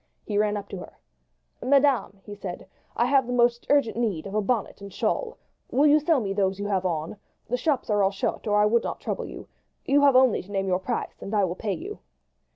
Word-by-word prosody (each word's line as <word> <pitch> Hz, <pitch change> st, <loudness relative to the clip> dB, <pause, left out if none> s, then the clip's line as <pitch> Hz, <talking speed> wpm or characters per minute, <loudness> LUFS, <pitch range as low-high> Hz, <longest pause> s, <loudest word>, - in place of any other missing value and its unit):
He 205 Hz, -1 st, -1 dB
ran 210 Hz, 0 st, +1 dB
up 200 Hz, -1 st, -7 dB
to 195 Hz, -, -6 dB
her. -, -, -11 dB, 0.6 s
"Madam," 265 Hz, -8 st, +2 dB
he 205 Hz, -, -9 dB
said, 190 Hz, -2 st, -7 dB, 0.3 s
"I 235 Hz, -, +2 dB
have 265 Hz, -1 st, +3 dB
the 250 Hz, -, -2 dB
most 240 Hz, -1 st, +2 dB
urgent 280 Hz, -6 st, +2 dB
need 210 Hz, -10 st, -1 dB
of 195 Hz, -, -7 dB
a 215 Hz, -, +1 dB
bonnet 220 Hz, -1 st, -2 dB
and 200 Hz, 0 st, -9 dB
shawl. 475 Hz, -, -2 dB, 0.3 s
Will 280 Hz, +4 st, +3 dB
you 300 Hz, +1 st, +6 dB
sell 300 Hz, -1 st, +2 dB
me 200 Hz, -4 st, -2 dB
those 195 Hz, -1 st, 0 dB
you 205 Hz, -, -4 dB
have 190 Hz, -2 st, 0 dB
on? 160 Hz, +3 st, -3 dB, 0.3 s
The 245 Hz, -, +1 dB
shops 265 Hz, +1 st, 0 dB
are 205 Hz, -1 st, +3 dB
all 195 Hz, -, +4 dB
shut, 200 Hz, +3 st, -3 dB
or 210 Hz, 0 st, +2 dB
I 210 Hz, -, +5 dB
would 230 Hz, +2 st, +2 dB
not -, -, -4 dB
trouble -, -, -4 dB
you. -, -, -10 dB, 0.4 s
You 285 Hz, +1 st, +3 dB
have 280 Hz, -2 st, +5 dB
only 255 Hz, -3 st, +5 dB
to 195 Hz, -, -14 dB
name 195 Hz, -1 st, -1 dB
your 180 Hz, -1 st, +1 dB
price, 185 Hz, -, -4 dB
and 205 Hz, -, -4 dB
I 205 Hz, -, +3 dB
will 175 Hz, -, -2 dB
pay 200 Hz, +2 st, -3 dB
you." 400 Hz, -, -7 dB
210 Hz, 240 wpm, -25 LUFS, 195-260 Hz, 0.6 s, you